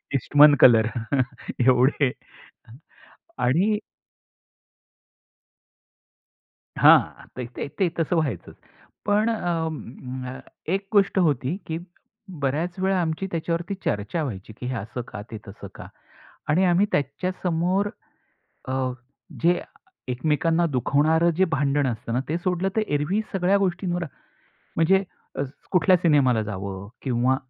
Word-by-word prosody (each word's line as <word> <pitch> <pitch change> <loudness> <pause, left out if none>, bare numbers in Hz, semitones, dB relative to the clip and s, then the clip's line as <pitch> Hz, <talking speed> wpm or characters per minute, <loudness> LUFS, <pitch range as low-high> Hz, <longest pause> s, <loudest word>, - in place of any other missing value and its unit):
Eastman 145 +3 +6
colour 110 -3 +7 0.8
एवढे 130 +1 +4 1.3
आणि 175 - +2 3.0
हां. - - +5
ते 125 - -4
ते - - -4
ते 190 -3 +3
तसं 165 +2 +1
व्हायचं. 140 - -2 0.5
पण 210 +2 +2
अ, 150 - -4 0.3
एक 195 0 -2
गोष्ट 200 -1 +3
होती, 145 -3 +1
की 160 - -2 0.6
बऱ्याच 160 +7 -1
वेळा 190 0 +1
आमची 165 +3 -2
त्याच्यावरती 170 +3 -2
चर्चा 105 +11 -1
व्हायची, 110 -6 -6
की 125 - -6
हे 130 - -2
असं 115 +3 -5
का, 105 - -7
ते 110 - -5
तसं 100 0 -9
का. - - -9 0.6
आणि 175 +6 +3
आम्ही 180 +3 +4
त्याच्यासमोर 180 +6 0 0.8
अ, 130 - -2 0.7
जे 175 +1 +3 0.5
एकमेकांना 160 +6 +1
दुखवणारं 150 +6 +2
जे 190 - +4
भांडण 145 -1 +1
असतं 115 -1 -4
ना 125 - +1
ते 165 - 0
सोडलं 180 +1 -1
तर 220 - +3
एरव्ही 150 +9 0
सगळ्या 190 +1 +3
गोष्टींवर 180 -2 -1 0.7
म्हणजे 190 +4 +4 0.7
कुठल्या 185 0 +4
सिनेमाला 140 -9 +3
जावं 100 -1 -6
किंवा 130 0 +1
160 Hz, 110 wpm, -24 LUFS, 130-180 Hz, 3.0 s, colour